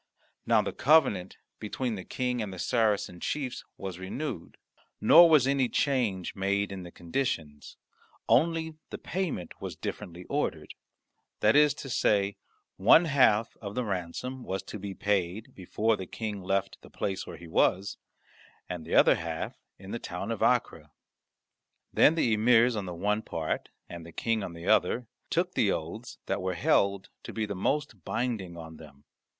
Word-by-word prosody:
Now -, -, +4 dB
the -, -, -4 dB
covenant 110 Hz, -, +3 dB, 0.2 s
between 120 Hz, +3 st, -3 dB
the 95 Hz, -3 st, -5 dB
King 125 Hz, +1 st, -2 dB
and 105 Hz, -3 st, -4 dB
the 95 Hz, -, -8 dB
Saracen 105 Hz, -4 st, 0 dB
chiefs 135 Hz, +1 st, -3 dB
was 95 Hz, -2 st, -6 dB
renewed, 105 Hz, -, -5 dB, 0.4 s
nor 170 Hz, +9 st, +8 dB
was 150 Hz, -5 st, +6 dB
any 135 Hz, -2 st, +2 dB
change 120 Hz, -, 0 dB
made 100 Hz, +1 st, 0 dB
in 95 Hz, -1 st, -6 dB
the 90 Hz, -, -9 dB
conditions; 85 Hz, -, -4 dB, 0.5 s
only 160 Hz, +2 st, +2 dB
the -, -, -6 dB
payment 165 Hz, -, -4 dB
was -, -, -5 dB
differently 90 Hz, +1 st, -6 dB
ordered; 80 Hz, -, -3 dB, 0.7 s
that 105 Hz, +4 st, +4 dB
is 150 Hz, -1 st, +5 dB
to -, -, -8 dB
say, 100 Hz, -5 st, +1 dB, 0.4 s
one 115 Hz, -, +6 dB
half 115 Hz, -7 st, +3 dB
of 100 Hz, -1 st, -7 dB
the 125 Hz, -, 0 dB
ransom 100 Hz, +7 st, -4 dB
was 95 Hz, -3 st, -3 dB
to 105 Hz, -, -8 dB
be 100 Hz, 0 st, -6 dB
paid 100 Hz, +1 st, -1 dB
before 110 Hz, +4 st, 0 dB
the 95 Hz, -3 st, -7 dB
King 105 Hz, -1 st, -5 dB
left 95 Hz, +1 st, -1 dB
the -, -, -15 dB
place 95 Hz, -2 st, -3 dB
where -, -, -8 dB
he 85 Hz, -, -11 dB
was, 95 Hz, +4 st, +1 dB, 0.7 s
and 90 Hz, -3 st, -5 dB
the 80 Hz, -, -2 dB
other -, -, +7 dB
half 80 Hz, -1 st, -5 dB, 0.2 s
in 95 Hz, +1 st, -10 dB
the 115 Hz, -, -3 dB
town 95 Hz, +3 st, -5 dB
of 115 Hz, -, -4 dB
Acre. -, -, +1 dB, 1.0 s
Then 155 Hz, -, +5 dB
the 125 Hz, -9 st, +2 dB
emirs 115 Hz, +2 st, +4 dB
on 100 Hz, -3 st, -3 dB
the 90 Hz, -, -5 dB
one 105 Hz, +5 st, 0 dB
part 80 Hz, -6 st, -3 dB, 0.2 s
and 85 Hz, -1 st, -8 dB
the 85 Hz, -, -11 dB
King 115 Hz, +5 st, -1 dB
on 90 Hz, -, -5 dB
the 85 Hz, 0 st, -9 dB
other 115 Hz, +7 st, +2 dB, 0.2 s
took 180 Hz, +2 st, 0 dB
the 100 Hz, -, +2 dB
oaths 95 Hz, +10 st, -5 dB
that -, -, -2 dB
were 95 Hz, 0 st, -2 dB
held 100 Hz, +3 st, +2 dB
to -, -, -8 dB
be 110 Hz, -1 st, -2 dB
the 100 Hz, -, -4 dB
most 110 Hz, -, -2 dB
binding 105 Hz, -8 st, -3 dB
on 80 Hz, -1 st, -9 dB
them. 70 Hz, -3 st, -15 dB
100 Hz, 170 wpm, -29 LUFS, 90-125 Hz, 1.0 s, nor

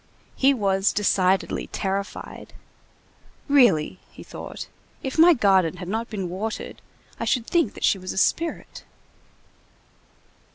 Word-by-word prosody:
He 270 Hz, +1 st, +4 dB
was 195 Hz, -6 st, +1 dB
decidedly 190 Hz, -2 st, +1 dB
terrified. 195 Hz, +1 st, -5 dB, 0.9 s
"Really," 220 Hz, -, +3 dB
he -, -, -13 dB
thought, -, -, -8 dB, 0.4 s
"if 265 Hz, +3 st, -3 dB
my 340 Hz, +1 st, +7 dB
garden 190 Hz, -, +2 dB
had 180 Hz, -, -7 dB
not 225 Hz, +4 st, -3 dB
been 195 Hz, -5 st, -4 dB
watered, 200 Hz, +5 st, -5 dB, 0.4 s
I -, -, -2 dB
should 245 Hz, -3 st, 0 dB
think 335 Hz, -, 0 dB
that -, -, -9 dB
she 195 Hz, -, +3 dB
was 185 Hz, 0 st, -6 dB
a -, -, -7 dB
spirit." 330 Hz, -, -1 dB
200 Hz, 125 wpm, -24 LUFS, 190-255 Hz, 0.9 s, my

